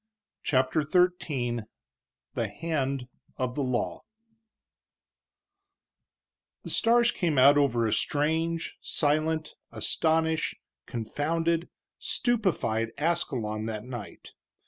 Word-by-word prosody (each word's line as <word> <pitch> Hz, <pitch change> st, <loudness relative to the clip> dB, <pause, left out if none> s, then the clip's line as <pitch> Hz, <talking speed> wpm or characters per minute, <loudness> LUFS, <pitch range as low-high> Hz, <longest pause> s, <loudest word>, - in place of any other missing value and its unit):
CHAPTER 130 Hz, +2 st, +2 dB
XIII 150 Hz, -7 st, +1 dB, 0.7 s
THE -, -, -1 dB
HAND 140 Hz, -5 st, -2 dB, 0.3 s
OF 130 Hz, -1 st, -1 dB
THE 145 Hz, -, -2 dB
LAW 125 Hz, -2 st, -1 dB, 2.6 s
The -, -, -6 dB
stars 235 Hz, 0 st, +4 dB
came 165 Hz, -6 st, 0 dB
out 140 Hz, +3 st, +8 dB
over 125 Hz, -5 st, +3 dB
a 110 Hz, -, +1 dB
strange, 160 Hz, +3 st, 0 dB
silent, 155 Hz, +1 st, 0 dB, 0.2 s
astonished, 160 Hz, 0 st, +1 dB, 0.3 s
confounded, 165 Hz, +8 st, -1 dB, 0.3 s
stupefied 180 Hz, -, 0 dB
Ascalon 125 Hz, -10 st, -1 dB
that 110 Hz, -1 st, -4 dB
night. 120 Hz, -5 st, -8 dB
150 Hz, 85 wpm, -28 LUFS, 125-165 Hz, 2.6 s, out